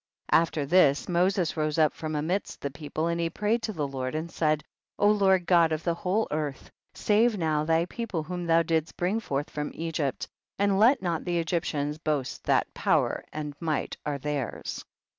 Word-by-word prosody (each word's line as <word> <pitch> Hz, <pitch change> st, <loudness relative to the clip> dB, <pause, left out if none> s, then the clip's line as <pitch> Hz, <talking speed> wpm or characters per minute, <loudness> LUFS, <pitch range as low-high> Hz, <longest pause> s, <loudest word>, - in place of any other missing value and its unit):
34. -, -, +7 dB
After 160 Hz, -3 st, -2 dB
this 145 Hz, -3 st, +4 dB
Moses 180 Hz, 0 st, +1 dB
rose 155 Hz, -1 st, -1 dB
up 155 Hz, -2 st, +4 dB
from 155 Hz, -1 st, -4 dB
amidst 170 Hz, +7 st, -2 dB
the 140 Hz, -, -3 dB
people, 150 Hz, +2 st, -4 dB
and 170 Hz, 0 st, 0 dB
he 165 Hz, -, 0 dB
prayed 210 Hz, +6 st, 0 dB
to 225 Hz, -, -2 dB
the 150 Hz, -8 st, -2 dB
Lord 130 Hz, 0 st, -4 dB
and 160 Hz, +2 st, -3 dB
said, 155 Hz, -3 st, +1 dB, 0.4 s
35. 205 Hz, 0 st, +4 dB
Lord 190 Hz, -2 st, +4 dB
God 170 Hz, -3 st, +4 dB
of 155 Hz, 0 st, -2 dB
the 170 Hz, -, +1 dB
whole 185 Hz, +6 st, 0 dB
earth, 150 Hz, -2 st, -3 dB, 0.2 s
save 220 Hz, +1 st, +3 dB
now 155 Hz, -3 st, +1 dB
thy 165 Hz, +1 st, +2 dB
people 190 Hz, -4 st, -4 dB
whom 175 Hz, +2 st, -5 dB
thou 165 Hz, 0 st, +4 dB
didst 160 Hz, -1 st, -1 dB
bring 185 Hz, +5 st, 0 dB
forth 145 Hz, -8 st, -3 dB
from 150 Hz, 0 st, -3 dB
Egypt, 160 Hz, -5 st, -2 dB, 0.3 s
and 200 Hz, -1 st, +2 dB
let 240 Hz, +2 st, +5 dB
not 170 Hz, -3 st, -1 dB
the 175 Hz, -1 st, -1 dB
Egyptians 160 Hz, -3 st, -1 dB
boast 150 Hz, -5 st, -2 dB
that -, -, +2 dB
power -, -, +1 dB
and 150 Hz, -1 st, -5 dB
might 155 Hz, -4 st, -2 dB
are 145 Hz, -1 st, -2 dB
theirs. 140 Hz, -3 st, -4 dB
165 Hz, 190 wpm, -27 LUFS, 150-180 Hz, 0.4 s, 34